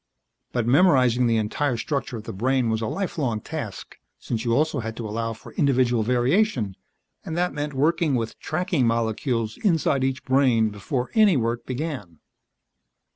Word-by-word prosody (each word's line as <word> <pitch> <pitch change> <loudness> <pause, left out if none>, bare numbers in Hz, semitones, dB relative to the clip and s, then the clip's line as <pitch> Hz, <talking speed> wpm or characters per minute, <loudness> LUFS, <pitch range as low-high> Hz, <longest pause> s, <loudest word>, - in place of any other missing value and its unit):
But 120 -2 -1
memorizing 125 -4 +4
the 115 -1 +2
entire 120 +4 0
structure 140 -1 -3
of 110 - -8
the - - -7
brain 125 +3 +1
was 110 0 -1
a 110 - -1
lifelong 145 - -2
task, - - -7 0.2
since 115 -2 -4
you 120 - 0
also 150 +3 +1
had 115 -1 -5
to 115 - -4
allow 115 +2 -2
for 110 - -13
individual 125 -4 +2
variation, 125 - +1 0.5
and 160 - -5
that 180 -2 0
meant 145 0 -4
working 155 +1 +2
with 115 -2 -3
"tracking" 160 -5 0
molecules 115 0 -1
inside 160 -8 +1
each 130 0 -2
brain 125 -5 +3
before 125 +5 -3
any 210 -7 +5
work 115 0 -2
began. 130 - -4
125 Hz, 160 wpm, -24 LUFS, 115-145 Hz, 0.5 s, any